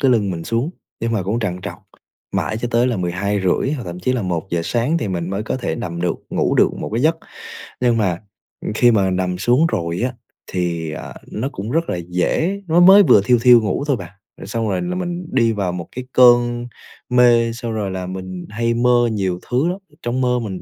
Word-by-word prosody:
cái 135 Hz, -, +3 dB
lưng 105 Hz, -5 st, +2 dB
mình 85 Hz, -2 st, -5 dB
xuống, 120 Hz, +8 st, -1 dB, 0.3 s
nhưng 115 Hz, 0 st, -1 dB
mà 110 Hz, -, 0 dB
cũng 105 Hz, +6 st, -1 dB
trằn 90 Hz, -3 st, -2 dB
trọc -, -, -7 dB, 0.5 s
mãi 110 Hz, -, -1 dB
cho 120 Hz, -, -2 dB
tới 120 Hz, +2 st, +3 dB
là 120 Hz, -4 st, 0 dB
12:30 95 Hz, +6 st, 0 dB
hoặc 135 Hz, -7 st, -4 dB
thậm 90 Hz, 0 st, -7 dB
chí 125 Hz, +7 st, 0 dB
là 125 Hz, -, -1 dB
1:00 85 Hz, -1 st, -2 dB
sáng 125 Hz, +8 st, 0 dB
thì 105 Hz, -, -3 dB
mình 90 Hz, -1 st, -3 dB
mới 100 Hz, +2 st, -2 dB
có 110 Hz, -, -3 dB
thể 125 Hz, -, -3 dB
nằm 85 Hz, -7 st, -5 dB
được 90 Hz, 0 st, 0 dB
ngủ -, -, +1 dB
được -, -, +5 dB
một -, -, -6 dB
cái 120 Hz, -, 0 dB
giấc. 160 Hz, +1 st, +3 dB, 0.7 s
Nhưng 120 Hz, -2 st, +3 dB
mà 95 Hz, -6 st, 0 dB, 0.6 s
khi 120 Hz, +2 st, +5 dB
mà 100 Hz, -4 st, +2 dB
nằm 90 Hz, 0 st, -1 dB
xuống 125 Hz, -, +3 dB
rồi 85 Hz, -, -2 dB
á 125 Hz, +1 st, -1 dB, 0.4 s
thì, 85 Hz, -3 st, -2 dB
à, 75 Hz, -, -7 dB, 0.2 s
nó 125 Hz, +6 st, -3 dB
cũng 105 Hz, +1 st, -6 dB
rất 165 Hz, +2 st, 0 dB
là -, -, -1 dB
dễ 165 Hz, -, 0 dB
nó 165 Hz, +2 st, +3 dB
mới 190 Hz, +3 st, +8 dB
vừa 105 Hz, -, +6 dB
thiu 120 Hz, +1 st, +4 dB
thiu 120 Hz, -1 st, +7 dB
ngủ 105 Hz, +6 st, -1 dB
thôi 140 Hz, -, +2 dB
bạn, 90 Hz, -3 st, -9 dB, 0.3 s
rồi -, -, -9 dB
xong 115 Hz, 0 st, -2 dB
rồi 95 Hz, -, -1 dB
là 180 Hz, 0 st, -3 dB
mình 175 Hz, -1 st, -4 dB
đi 115 Hz, -3 st, +3 dB
vào 100 Hz, -5 st, -1 dB
một 90 Hz, -1 st, -6 dB
cái 125 Hz, 0 st, -5 dB
cơn 120 Hz, -1 st, +5 dB, 0.4 s
mê, 120 Hz, -2 st, +4 dB
xong 115 Hz, -1 st, -5 dB
rồi 105 Hz, -3 st, -2 dB
là 95 Hz, -1 st, -4 dB
mình 95 Hz, -1 st, -6 dB
hay 115 Hz, +2 st, -1 dB
mơ 120 Hz, 0 st, +3 dB
nhiều 95 Hz, -4 st, -1 dB
thứ 130 Hz, +7 st, +1 dB
lắm, 180 Hz, +2 st, -1 dB
ở 150 Hz, -, -24 dB
trong 125 Hz, +2 st, -2 dB
mơ 125 Hz, -1 st, +2 dB
mình 100 Hz, -5 st, -5 dB
115 Hz, 230 wpm, -19 LUFS, 95-125 Hz, 0.7 s, mới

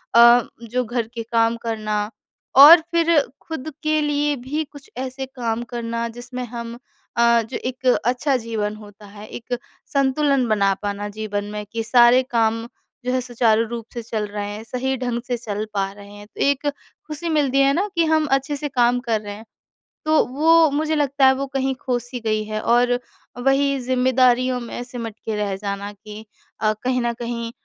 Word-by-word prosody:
अ, 235 Hz, +1 st, +8 dB, 0.2 s
जो 245 Hz, +2 st, -1 dB
घर 235 Hz, 0 st, -2 dB
के 230 Hz, -1 st, -4 dB
काम 230 Hz, 0 st, +1 dB
करना। 215 Hz, -2 st, -2 dB, 0.5 s
और 300 Hz, +5 st, +11 dB
फ़िर 335 Hz, -2 st, +4 dB, 0.2 s
खुद 315 Hz, -2 st, -6 dB
के 310 Hz, 0 st, +2 dB
लिए 295 Hz, 0 st, +1 dB
भी 275 Hz, +5 st, -3 dB
कुछ 285 Hz, -2 st, -14 dB
ऐसे 260 Hz, +1 st, -4 dB
काम 240 Hz, -3 st, -3 dB
करना 235 Hz, -1 st, -3 dB
जिसमें 245 Hz, +2 st, -7 dB
हम 235 Hz, 0 st, -7 dB, 0.4 s
अ, 235 Hz, 0 st, +5 dB
जो 225 Hz, +3 st, -5 dB
एक 255 Hz, +1 st, -6 dB, 0.2 s
अच्छा 255 Hz, +3 st, +1 dB
जीवन 220 Hz, -3 st, -3 dB
होता 210 Hz, -1 st, -14 dB
है। 205 Hz, +1 st, -11 dB
एक 245 Hz, +2 st, -5 dB, 0.4 s
संतुलन 275 Hz, -1 st, +2 dB
बना 200 Hz, -2 st, +3 dB
पाना 205 Hz, 0 st, -3 dB
जीवन 205 Hz, -1 st, -4 dB
में 210 Hz, 0 st, -5 dB
कि 230 Hz, 0 st, -2 dB
सारे 240 Hz, +2 st, +5 dB
काम 230 Hz, 0 st, +1 dB, 0.4 s
जो 250 Hz, -, 0 dB
है 255 Hz, -, +1 dB
सुचारू 230 Hz, -2 st, +2 dB
रूप 235 Hz, -1 st, -6 dB
से 240 Hz, -, -4 dB
चल 220 Hz, -1 st, -3 dB
रहे 205 Hz, 0 st, -4 dB
हैं। 210 Hz, +1 st, -7 dB
सही 255 Hz, +3 st, -2 dB
ढंग 245 Hz, -1 st, -2 dB
से 245 Hz, -1 st, -1 dB
चल 215 Hz, -2 st, -4 dB
पा 195 Hz, -1 st, -1 dB
रहे 200 Hz, 0 st, -13 dB
हैं। 205 Hz, 0 st, -12 dB
तो -, -, -9 dB
एक 280 Hz, +1 st, +1 dB, 0.4 s
खुशी 310 Hz, +2 st, -4 dB
मिलती 280 Hz, -4 st, +2 dB
है 275 Hz, 0 st, +4 dB
ना, 385 Hz, +7 st, 0 dB
कि 335 Hz, -1 st, +3 dB
हम 315 Hz, -1 st, +2 dB
अच्छे 275 Hz, +2 st, +1 dB
से 290 Hz, +1 st, -4 dB
काम 245 Hz, -2 st, +2 dB
कर 230 Hz, -4 st, -1 dB
रहे 205 Hz, -1 st, -7 dB
हैं। 220 Hz, +2 st, -12 dB, 0.6 s
तो 310 Hz, 0 st, +4 dB
वो 320 Hz, +4 st, +4 dB
मुझे 310 Hz, +2 st, 0 dB
लगता 280 Hz, -2 st, +2 dB
है 265 Hz, -, +6 dB
वो 275 Hz, +1 st, -2 dB
कहीं 270 Hz, 0 st, -1 dB
खो-सी 245 Hz, -1 st, -3 dB
गई 215 Hz, -1 st, 0 dB
है 215 Hz, 0 st, -3 dB
और 245 Hz, +1 st, +3 dB, 0.4 s
वहीं 275 Hz, +1 st, +3 dB
ज़िम्मेदारियों 255 Hz, 0 st, +2 dB
में 235 Hz, +1 st, -6 dB
सिमट 235 Hz, -3 st, -7 dB
के 220 Hz, -, -2 dB
रह 205 Hz, -2 st, -1 dB
जाना 200 Hz, +1 st, -4 dB
कि 210 Hz, +1 st, -11 dB, 0.4 s
अ, 215 Hz, 0 st, +2 dB
कहीं 255 Hz, 0 st, +1 dB
न 235 Hz, 0 st, 0 dB
कहीं 235 Hz, -1 st, -5 dB
240 Hz, 185 wpm, -22 LUFS, 220-270 Hz, 0.6 s, और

